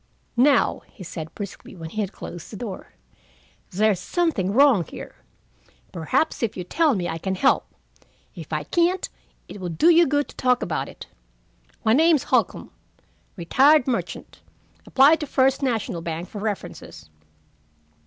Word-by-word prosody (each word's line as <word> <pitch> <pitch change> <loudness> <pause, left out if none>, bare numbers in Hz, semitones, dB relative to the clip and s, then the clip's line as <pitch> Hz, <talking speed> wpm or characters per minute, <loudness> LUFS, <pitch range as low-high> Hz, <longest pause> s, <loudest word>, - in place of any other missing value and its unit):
"Now," 265 +1 +3
he 195 - -13
said 160 -2 -8
briskly, 200 -1 -8
when 165 -2 -8
he 215 - -2
had 200 -2 -3
closed 175 -5 -9
the 210 - -7
door, 210 -5 -7 0.8
"there's 205 0 +1
something 285 - 0
wrong 255 -5 +5
here. - - -10 0.8
Perhaps 170 - -1
if 230 -3 -2
you 180 - -4
tell 300 - +2
me, 180 -3 -2
I 165 - -4
can 190 +3 -2
help. 265 +8 +1 0.6
If - - -10
I - - -1
can't, 350 +2 +1 0.4
it 200 - -10
will 180 - -3
do 305 - +4
you 340 0 +5
good 290 +1 +1
to - - -13
talk 250 -1 +1
about 165 - -3
it. - - -11 0.8
My 220 - +3
name's 315 +1 +4
Holcombe, - - 0 0.6
retired 265 - +4
merchant. 245 -3 -4 0.5
Apply 280 +4 +5
to 300 - -5
First 265 +1 +2
National 225 -9 -1
Bank 165 +1 -5
for 210 - -7
references." 200 - -6
220 Hz, 155 wpm, -23 LUFS, 180-285 Hz, 0.8 s, wrong